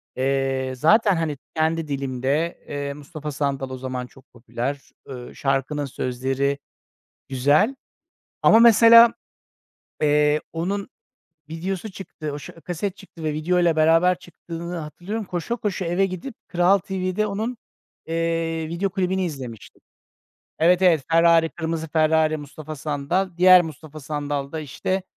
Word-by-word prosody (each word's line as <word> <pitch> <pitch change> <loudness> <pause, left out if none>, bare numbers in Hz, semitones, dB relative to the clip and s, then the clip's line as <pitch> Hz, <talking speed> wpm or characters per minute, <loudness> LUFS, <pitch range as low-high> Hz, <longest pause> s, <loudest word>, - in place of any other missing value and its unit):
eee, 135 0 0
zaten, 200 - +4
hani, 160 -3 -2 0.2
kendi 160 0 0
dilimde. 140 +3 -2
Eee, 140 0 -4
Mustafa 150 +1 -7
Sandal 135 -1 -2
o 130 - -6
zaman 130 -1 -5
çok 130 +1 -21
popüler. 125 +3 -4 0.3
Eee, 125 -2 -8
şarkının 140 +2 -1
sözleri 135 +2 -2 0.7
güzel. 145 - +3 0.7
Ama 225 - +7
mesela, 230 0 +8 0.9
eee, 150 0 +3
onun 195 +5 -3 0.6
videosu 185 +5 -4
çıktı. 165 -5 -7
O 145 - -5
ş - - -10
kaset 175 +3 -4
çıktı 185 -4 -13
ve 155 -1 -1
videoyla 170 +2 +2
beraber 165 +3 +4
çıktığını 170 -1 -8
hatırlıyorum. 175 +7 -5
Koşa 180 +6 -3
koşa 200 -5 -3
eve 175 +3 +2
gidip 190 +6 -6
Kral 180 +2 +3
TV'de 190 +2 -2
onun, 220 +5 -3 0.5
eee, 165 0 -1
video 170 +5 -1
klibini 190 0 -1
izlemiştim. 130 - -8 0.8
Evet, 175 +3 +4
evet. 170 -6 +4
Ferrari, 165 0 +5
kırmızı 160 -1 -4
Ferrari, 155 0 +2
Mustafa 155 +1 -8
Sandal. 150 +6 -1
Diğer 185 0 +8
Mustafa 155 -2 -9
Sandal 145 -1 -3
da 160 - -4
işte, 180 +6 -3
160 Hz, 130 wpm, -23 LUFS, 145-180 Hz, 0.9 s, mesela